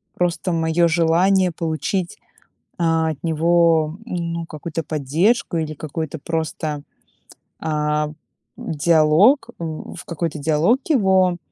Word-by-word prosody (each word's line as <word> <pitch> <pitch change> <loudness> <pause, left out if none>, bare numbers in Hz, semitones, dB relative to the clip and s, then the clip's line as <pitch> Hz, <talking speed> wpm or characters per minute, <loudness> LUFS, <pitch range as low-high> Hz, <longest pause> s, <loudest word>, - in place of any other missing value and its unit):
просто 175 0 -1
моё 165 +1 +2
желание 175 +3 +3
получить, 170 +3 -3 0.6
а, 165 -1 +2
от 155 - -7
него, 165 0 +2
ну, 170 -4 -3
какую-то 165 +1 -5
поддержку 160 - 0
или 155 -1 -3
какой-то 155 +1 -5
просто, 155 -1 -3 0.8
а, 150 -1 -1 0.5
диалог. 160 - +3
В 160 -2 -6
какой-то 165 -2 -3
диалог 160 - +2
его, 190 - +3
165 Hz, 100 wpm, -21 LUFS, 155-175 Hz, 0.8 s, желание